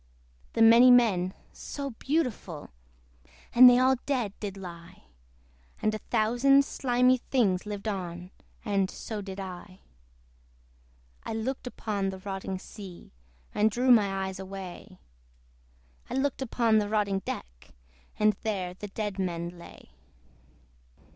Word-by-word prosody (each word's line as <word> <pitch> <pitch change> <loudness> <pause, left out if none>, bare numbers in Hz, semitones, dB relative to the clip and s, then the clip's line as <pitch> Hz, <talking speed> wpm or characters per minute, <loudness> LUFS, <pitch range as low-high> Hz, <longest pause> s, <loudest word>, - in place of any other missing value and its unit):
The 225 - +4
many 230 +3 +8
men, 200 -7 +4 0.2
so 280 -1 -6
beautiful! 230 - -3 0.8
And 250 +1 +10
they 245 - +5
all 260 +1 +4
dead 245 -8 -1
did 200 -2 -5
lie: 170 -3 -10 0.8
And 215 - 0
a 215 - -3
thousand 245 +6 +3
thousand - - -11
slimy 250 -1 +2
things 210 -7 0
Lived 205 +1 -5
on; 180 -3 -5 0.3
and 195 -3 +1
so 215 -1 -6
did 195 0 -7
I. 185 0 -8 1.4
I - - -5
looked 250 +4 -3
upon 205 -5 -2
the 190 - -6
rotting 190 0 -5
sea, 185 -1 -11 0.4
And 215 +1 +3
drew 250 +4 +2
my 195 -4 +3
eyes 190 0 -6
away; 190 0 -8 1.1
I - - -4
looked 270 0 -1
upon 230 -3 +2
the 205 -1 -2
rotting 205 -2 +1
deck, - - -8 0.5
And 215 0 +3
there 190 -5 -2
the 205 +3 -8
dead 205 -1 -4
men 170 -2 -2
lay. 175 -1 -14
205 Hz, 130 wpm, -28 LUFS, 190-240 Hz, 1.4 s, And